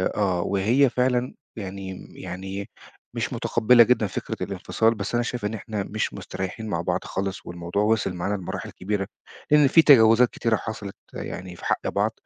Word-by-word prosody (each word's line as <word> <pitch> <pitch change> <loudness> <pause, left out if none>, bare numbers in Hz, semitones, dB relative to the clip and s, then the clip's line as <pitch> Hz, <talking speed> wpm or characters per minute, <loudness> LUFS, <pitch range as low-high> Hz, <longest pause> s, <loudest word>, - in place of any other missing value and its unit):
آه 95 -4 +1
وهي 115 +9 +3
فعلًا 125 0 0 0.2
يعني 95 -2 -7
يعني 95 +2 -6 0.4
مش - - -2
متقبلة 120 +1 +5
جدًا 115 -2 +2
فكرة 95 - -5
الانفصال، 115 +1 0
بس 100 +3 -4
أنا 120 - +2
شايف 120 -3 -4
إن 105 - -1
إحنا 105 -1 -4
مش 110 +2 -3
مستريحين 95 +4 -5
مع 85 -5 -1
بعض - - -1
خالص، 95 +1 -4
والموضوع 85 +3 -2
وصل 110 -3 +1
معانا 90 +3 -2
لمراحل 95 -3 -5
كبيرة، 100 +1 -3 0.4
لإن 150 -2 +7
في 165 +4 +6
تجاوزات 120 -4 +7
كتيرة 115 -1 0
حصلت 105 -3 -6 0.2
يعني 90 -1 -6
في - - -11
حق - - 0
بعض - - +1
105 Hz, 165 wpm, -25 LUFS, 95-115 Hz, 0.4 s, لإن